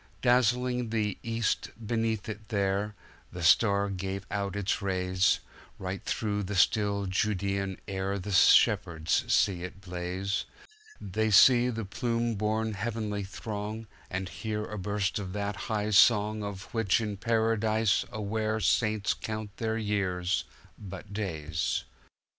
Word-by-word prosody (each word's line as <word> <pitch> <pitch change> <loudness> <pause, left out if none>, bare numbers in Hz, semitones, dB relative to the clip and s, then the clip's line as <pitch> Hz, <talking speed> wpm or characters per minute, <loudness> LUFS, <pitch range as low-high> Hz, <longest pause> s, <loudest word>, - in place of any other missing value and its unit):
Dazzling 125 0 +2
the 105 -3 -1
East 115 -2 -1 0.2
beneath 115 -1 -1
it 105 0 -7
there, 100 0 0 0.4
The 90 -1 -6
Star 100 +3 +4
gave 95 +1 -4
out 100 -1 -2
its 100 -1 -1
rays:Right 95 0 -1
through 105 -2 -1
the 100 +1 -4
still 100 +1 +2
Judean 95 0 -1
air 95 0 -2
The 100 +2 -5
shepherds 95 -4 +4
see 90 -3 +3
it 90 +2 -7
blaze, 90 +1 -3 0.5
They 110 +3 -1
see 120 +4 +7
the 115 -3 -3
plume 115 +3 -1
borne 110 +1 -1
heavenly 105 -1 -3
throng, 105 +2 -5 0.2
And 95 0 -3
hear 105 +3 -4
a 105 - -6
burst 100 +1 -1
of 95 -2 -5
that 100 0 -2
high 105 -1 0
song 105 0 +5
Of 100 -1 -7
which 115 -3 +2
in 105 -3 -3
Paradise 110 -1 +2
aware 110 0 -1
Saints 105 -1 +2
count 110 -2 -6
their 110 -1 -1
years 95 -4 0 0.3
but 100 +1 -9
days. 80 -7 -2
105 Hz, 130 wpm, -29 LUFS, 95-110 Hz, 0.5 s, see